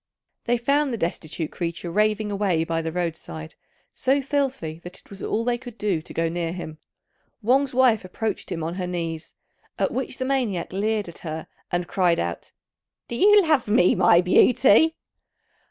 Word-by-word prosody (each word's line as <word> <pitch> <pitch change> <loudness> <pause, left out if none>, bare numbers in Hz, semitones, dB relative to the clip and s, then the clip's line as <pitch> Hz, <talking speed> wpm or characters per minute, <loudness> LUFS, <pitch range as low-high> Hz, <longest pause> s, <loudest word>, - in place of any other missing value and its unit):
They 240 +1 +2
found 280 +4 +1
the 235 - -2
destitute 160 -3 -3
creature 170 0 -4
raving 215 +2 +1
away 195 -5 +1
by 165 0 -1
the 165 0 -3
road 170 -1 -1
side, 80 - -9 0.4
so 270 +2 +1
filthy 270 - -2
that 175 +1 -8
it - - -21
was 195 - -10
all 225 - -1
they 240 -1 0
could 245 -3 -10
do 200 -8 0
to - - -12
go 165 0 0
near 165 0 -2
him. 160 -4 -7 0.6
Wang's 265 +4 +3
wife 250 -5 +4
approached 195 +2 -4
him 165 -3 -3
on 165 +1 -3
her 180 - -2
knees; 165 -2 -4 0.4
at - - 0
which 260 0 -3
the 260 - -2
maniac 245 -11 -1
leered 210 +1 0
at 170 - -10
her, 160 -1 -5 0.3
and 175 0 -1
cried 180 -3 +2
out, 85 0 -4 0.6
"Do 235 - -4
you 415 - +6
love 310 -8 +2
me, 205 -4 +4
my 175 -1 +5
beauty?" 255 - +5
195 Hz, 180 wpm, -24 LUFS, 170-245 Hz, 0.6 s, you